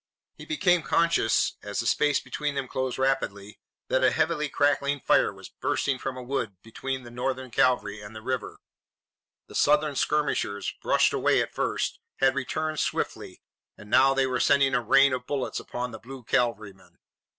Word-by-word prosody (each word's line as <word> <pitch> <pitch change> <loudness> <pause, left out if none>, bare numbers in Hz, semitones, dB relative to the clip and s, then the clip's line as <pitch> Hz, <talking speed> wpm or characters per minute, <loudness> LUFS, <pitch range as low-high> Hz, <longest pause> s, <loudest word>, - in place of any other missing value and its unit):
He - - -12
became 180 - +2
conscious, 165 -9 +2
as 105 0 -4
the 115 - -2
space 145 +3 +2
between 145 +3 -4
them 135 -2 -2
closed 130 -1 -3
rapidly, 105 -7 -1 0.3
that - - +1
a - - +6
heavy 150 -1 0
crackling 145 0 +1
fire - - +3
was - - -12
bursting 135 -2 -1
from 130 0 -4
a 125 - -6
wood 120 -6 -3
between 130 +3 -5
the 120 - -11
Northern 130 +1 -3
cavalry 110 -4 +1
and 105 +1 -11
the 110 - -9
river. 130 -2 -3 0.9
The - - -15
Southern 150 0 +2
skirmishers, 140 -9 0
brushed - - +3
away - - +2
at - - -2
first, - - -2 0.2
had 135 0 +3
returned 155 +3 -2
swiftly, - - -3 0.3
and 105 +1 -13
now 135 +2 +5
they 135 0 +3
were 130 -1 -1
sending 140 0 +3
a 125 - +2
rain 135 +3 +5
of 125 -1 -4
bullets 140 -3 -2
upon 125 0 -5
the 110 - -8
blue 130 +2 -10
cavalrymen. 105 -8 -2
130 Hz, 175 wpm, -26 LUFS, 115-140 Hz, 0.9 s, a